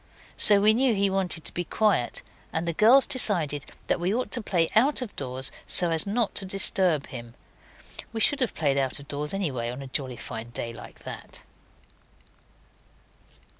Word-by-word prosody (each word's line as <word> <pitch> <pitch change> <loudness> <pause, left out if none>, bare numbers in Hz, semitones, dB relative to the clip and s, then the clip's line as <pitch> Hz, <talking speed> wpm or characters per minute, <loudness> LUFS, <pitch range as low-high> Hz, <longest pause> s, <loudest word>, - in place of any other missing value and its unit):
So 205 -1 +6
we 210 +2 +5
knew 245 0 +2
he 200 0 +1
wanted 185 -4 -2
to - - -4
be 175 - -2
quiet, 200 - 0 0.3
and 165 +1 -3
the 170 - 0
girls 240 - +5
decided 160 - 0 0.2
that - - 0
we 175 +2 0
ought 250 +4 -2
to 245 - 0
play 175 -6 0
out 260 +4 +4
of 225 - -10
doors 130 -1 0 0.2
so 175 -2 +3
as 160 +3 0
not 220 +1 0
to - - -5
disturb 185 -5 +2
him; 120 -2 -10 0.8
we 225 - -4
should 285 +5 +3
have 250 - 0
played 140 -3 0
out 135 +1 -2
of 140 - -13
doors 145 +1 -3
anyhow 135 -12 -2
on 135 +2 -8
a - - -8
jolly 130 -2 -3
fine 115 -1 -7
day 115 0 -5
like 105 - -13
that. - - -9
175 Hz, 180 wpm, -26 LUFS, 135-210 Hz, 0.8 s, So